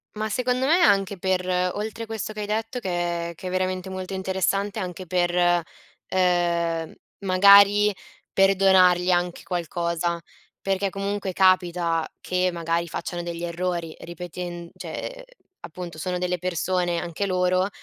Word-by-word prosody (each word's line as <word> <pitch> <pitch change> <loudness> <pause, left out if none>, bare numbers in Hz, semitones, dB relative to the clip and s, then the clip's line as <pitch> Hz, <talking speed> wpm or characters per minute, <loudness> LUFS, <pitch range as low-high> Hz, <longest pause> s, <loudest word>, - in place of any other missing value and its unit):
Ma 215 +1 -2
secondo 250 +3 0
me 340 +5 +4
anche 195 -1 +3
per 185 0 0 0.3
oltre 220 +2 -4
questo 220 -1 -4
che 210 - -5
hai 205 - -2
detto 225 +4 -2
che 175 -4 -2
che 185 - -8
è - - -2
veramente 185 0 -2
molto 185 0 -5
interessante 190 +2 -1
anche 185 -1 -5
per, 175 0 +1
ehm, 175 -1 0
m 200 - -17
magari 200 +2 +7 0.4
perdonargli 190 -2 +5
anche 175 -1 0
qualcosa, 170 -1 -2 0.4
perché 195 0 0
comunque 195 0 -3
capita 175 -3 +2
che 180 0 0
magari 170 0 -1
facciano 175 +1 -4
degli 170 -1 -5
errori 170 -1 -3
ripetend 175 0 -7
cioè, - - -6
ehm, - - -11 0.4
appunto 170 -1 -8
sono 180 +3 -2
delle 180 -1 -1
persone 180 0 -1
anche 175 +3 -3
loro, 185 0 +1
180 Hz, 140 wpm, -24 LUFS, 175-195 Hz, 0.4 s, magari